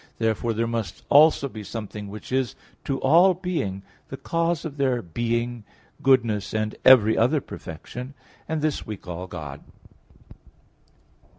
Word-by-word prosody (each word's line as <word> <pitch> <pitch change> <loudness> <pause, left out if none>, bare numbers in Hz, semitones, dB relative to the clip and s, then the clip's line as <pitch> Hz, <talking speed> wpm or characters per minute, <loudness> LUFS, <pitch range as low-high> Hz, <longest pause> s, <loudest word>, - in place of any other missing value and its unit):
Therefore 115 +1 0
there 115 +1 0
must 115 -6 -4
also 150 -1 +6
be 110 -5 -8
something 105 -1 -6
which 105 +4 -9
is 130 -2 0 0.3
to 135 -1 -1
all 175 +7 +5
beings 160 - -3 0.3
the 135 - -6
cause 165 +4 -1
of 150 -2 -6
their 130 -3 +1
being, 120 +4 -2 0.4
goodness, 115 -7 +2
and 110 0 -1
every 110 -4 +7
other 125 +7 +3
perfection; 125 - -9 0.3
and 160 -1 -1
this 155 -2 0
we 105 -2 -6
call 90 0 -7
God. 75 -6 -7
120 Hz, 135 wpm, -24 LUFS, 105-140 Hz, 0.4 s, every